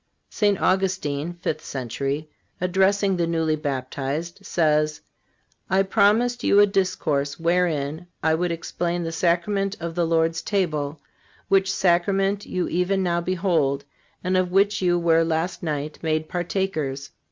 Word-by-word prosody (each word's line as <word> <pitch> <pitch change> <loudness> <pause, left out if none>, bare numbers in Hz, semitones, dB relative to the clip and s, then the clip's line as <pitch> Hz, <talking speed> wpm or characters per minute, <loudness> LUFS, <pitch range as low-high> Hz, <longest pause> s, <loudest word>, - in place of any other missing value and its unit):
" - - -49
St. 205 -2 +3
Augustine 175 -5 0
(fifth 155 0 -2
century), 135 +4 -3 0.3
addressing 190 +2 +2
the 170 -1 +1
newly 160 -2 +1
baptized, 145 +3 -4
says: 155 -2 +1 0.7
"I 190 +1 +3
promised 220 +5 +2
you 200 - +5
a 205 - +8
discourse 155 -8 -1
wherein 165 -2 0 0.2
I 160 - +3
would 175 +2 0
explain 170 +1 -2
the 165 - -3
sacrament 190 +4 0
of 170 -1 -4
the 170 0 0
Lord's 165 0 +1
table, 155 -7 -1 0.5
which 190 -1 +3
sacrament 195 +2 +1
you 180 -1 -1
even 185 +3 0
now 170 -1 +1
behold, 170 -7 0 0.4
and 185 +1 0
of 185 -1 +1
which 200 +2 +3
you 175 -1 +3
were 165 -1 +3
last 165 +2 -1
night 150 -2 -3
made 155 -1 -1
partakers. 175 -7 -2
170 Hz, 140 wpm, -24 LUFS, 155-190 Hz, 0.7 s, a